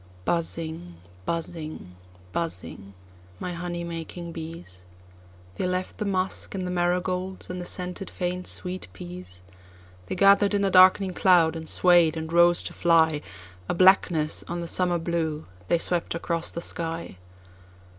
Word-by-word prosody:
Buzzing, 160 - -2 0.3
buzzing, 160 - -5 0.4
buzzing, 100 - -4 0.4
my 180 - -4
honey 175 0 -4
making 170 0 -6
bees, 160 - -8 0.8
They 185 - -1
left 185 0 -3
the 210 - -1
musk, 190 0 -2
and 185 -1 -3
the 180 - -3
marigolds 180 +1 -1
and 180 0 -5
the 175 - -6
scented 180 +1 -4
faint 180 0 -3
sweet 185 +1 -1
peas; 90 0 -10 0.6
They - - -3
gather'd 200 +2 +5
in 200 0 +1
a 195 - +1
darkening 185 +1 +6
cloud, 175 -4 +4
and 160 -1 -5
sway'd, 175 -3 +4
and 160 +1 -5
rose 170 0 +5
to - - -5
fly;A 150 - 0
blackness 175 -4 +4
on 175 +1 -4
the 170 - -4
summer 180 0 +2
blue, 165 -2 -2 0.2
they - - +3
swept 170 0 -1
across 170 0 -2
the 170 - -5
sky. 165 - -3
170 Hz, 140 wpm, -26 LUFS, 160-180 Hz, 0.8 s, darkening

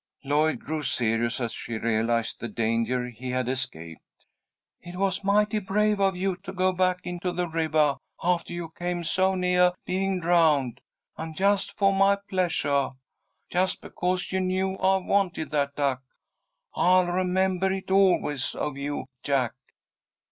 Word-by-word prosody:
Lloyd 150 +3 +2
grew 155 0 -4
serious 115 -2 +1
as 120 -2 -2
she 115 0 -5
realized 115 +1 0
the 120 - -4
danger 115 +3 0
he 125 +1 -8
had 125 -1 -1
escaped. 125 -12 -3 0.8
"It 175 +1 -10
was 195 +1 0
mighty 210 +2 +2
brave 210 +1 +1
of 195 -1 +2
you 185 0 -1
to 190 - -8
go 185 0 +1
back 185 0 +1
into 180 0 -3
the 175 0 -1
rivah 155 -3 +1 0.2
aftah 175 -1 0
you 175 -1 -5
came 175 +1 -3
so 190 +4 +2
neah 180 -1 +3
being 190 0 -1
drowned, 155 -8 +2 0.4
and 160 -1 -6
just 200 0 +1
fo' 195 -1 +4
my 195 +1 +4 0.2
pleasuah 145 -7 +1 0.6
just 185 +1 +1
because 180 +1 -2
you 190 - 0
knew 190 +1 0
I 190 0 +3
wanted 185 -6 0
that 140 -2 0
duck. 140 -3 0 0.7
I'll 185 0 +4
remembah 185 +1 +1
it 190 - -8
always 180 -8 +2
of 145 -2 -3
you, 145 +1 -3 0.2
Jack." 135 -4 0
175 Hz, 150 wpm, -26 LUFS, 140-190 Hz, 0.8 s, fo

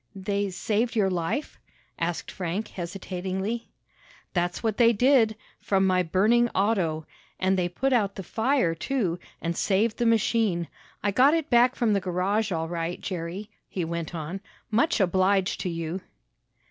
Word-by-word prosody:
"They 200 +1 -1
saved 220 +5 -1
your 195 -4 +2
life?" 180 - -2 0.4
asked 170 0 -2
Frank 185 +4 -3
hesitatingly. 190 +4 -4 0.6
"That's 175 +2 -1
what 220 -2 0
they 235 -1 +6
did 235 -1 +4 0.2
from 195 -1 +2
my 185 -1 +3
burning 215 +8 +3
auto. 185 -6 +1 0.3
And 190 +1 +2
they 180 -1 0
put 265 +10 0
out 205 -5 +2
the 195 - -6
fire, 225 - +1
too, 180 -2 -1 0.2
and 170 0 -1
saved 210 +5 +1
the 240 - +1
machine. 220 -6 +2 0.4
I 205 - +2
got 265 +9 +5
it 320 -2 -2
back 245 +2 +5
from 230 -4 +2
the 200 - +1
garage 195 +4 0
all 165 -2 -1
right, 170 +1 -3
Jerry," 185 +4 -5 0.2
he 180 -3 -2
went 170 0 -4
on. 170 +4 -5 0.3
"Much 235 +9 +2
obliged 190 +1 +2
to 185 - -2
you." 165 +2 -4
195 Hz, 155 wpm, -26 LUFS, 175-225 Hz, 0.6 s, they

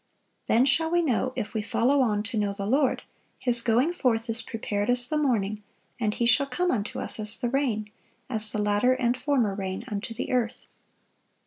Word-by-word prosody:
"Then 235 +3 +4
shall 320 +4 +2
we 345 +1 +2
know, 255 -3 +1
if 240 -5 -4
we 220 - -1
follow 260 +6 +2
on 210 -4 +1
to 225 +2 -5
know 205 -2 0
the 200 0 -5
Lord: 265 +4 +2 0.3
His 245 -2 +1
going 245 +9 +2
forth 230 -8 0
is 225 +1 -2
prepared 215 -2 -3
as 245 0 +3
the 305 - -2
morning; 215 -8 0 0.4
and 215 -3 +1
He 235 - -1
shall 275 +4 +3
come 355 +7 0
unto 215 -3 -2
us - - -4
as 215 0 -1
the 240 - -1
rain, 235 -6 -1 0.4
as 220 -4 -2
the - - -3
latter 210 +5 +3
and 245 -1 +1
former 255 -8 +1
rain 190 +1 -4
unto 220 +2 -4
the - - -4
earth." 245 -1 -1
235 Hz, 200 wpm, -27 LUFS, 210-260 Hz, 0.4 s, Then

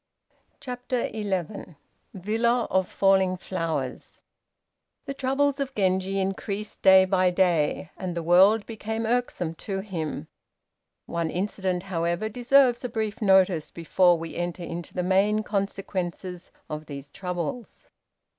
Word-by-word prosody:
] - - -41
CHAPTER 250 -1 -3
XI 195 -4 -4 0.4
VILLA 225 +5 +1
OF 190 0 +2
FALLING 190 -1 +3
FLOWERS 160 -8 -4 0.8
The 275 - -4
troubles 275 +1 0
of 275 -1 -3
Genji 190 0 +1
increased 195 +2 -3
day 190 0 +7
by 185 -1 +3
day, 175 -2 +1
and 180 -2 -4
the 170 - -3
world 195 +6 +5
became 225 0 -4
irksome 225 -8 -1 0.2
to 195 -1 -1
him. 165 - -5 0.8
One 170 -1 -2
incident, 185 0 -2
however, 175 +2 -1
deserves 245 +2 +3
a 250 - -2
brief 220 -1 -3
notice 190 -5 +4
before 175 +1 +3
we 165 0 -7
enter 175 +1 -3
into 170 0 -6
the 180 - 0
main 200 +4 +2
consequences 190 -3 -3 0.2
of 155 0 -6
these 140 -1 -7
troubles. 180 +8 -5
190 Hz, 125 wpm, -26 LUFS, 175-215 Hz, 0.8 s, day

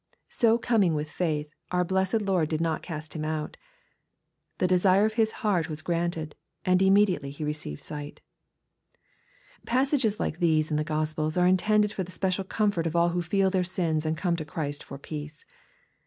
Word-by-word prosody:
So 230 -1 +3
coming 210 -9 +2
with 150 0 -3
faith, 155 -3 -2 0.2
our 180 0 +1
blessed 190 +4 +1
Lord 185 -6 +1
did 155 - -1
not 165 -1 0
cast 155 -2 -7
him 155 - -3
out. 155 0 -3 1.0
The - - +1
desire 185 +2 +4
of 220 - 0
his 220 -1 +2
heart 175 -6 +1
was 155 0 -5
granted, 165 -2 -2 0.3
and 185 0 +4
*^ - - +3
immediately 190 -7 +3
he 145 +3 -7
received 150 - -4
sight/' 145 -1 -7 1.5
Passages 255 -4 +1
like 160 - -2
these 155 -3 +2
in 150 - +1
the 150 - +1
Q 155 0 -3
ospels 155 +1 -1
are 180 - +4
intended 210 +3 +3
for 190 - -2
the 180 - -10
special 185 +1 -1
comfort 195 -4 0
of 165 - -4
all 170 0 +4
who 175 +1 -1
feel 190 +3 +1
their 185 -1 +2
sins 170 -4 0
and 155 0 -1
come 175 0 0
to 160 - -3
Christ 145 -2 -4
for 140 - -9
peace. 150 +1 -8
170 Hz, 185 wpm, -27 LUFS, 155-190 Hz, 1.5 s, desire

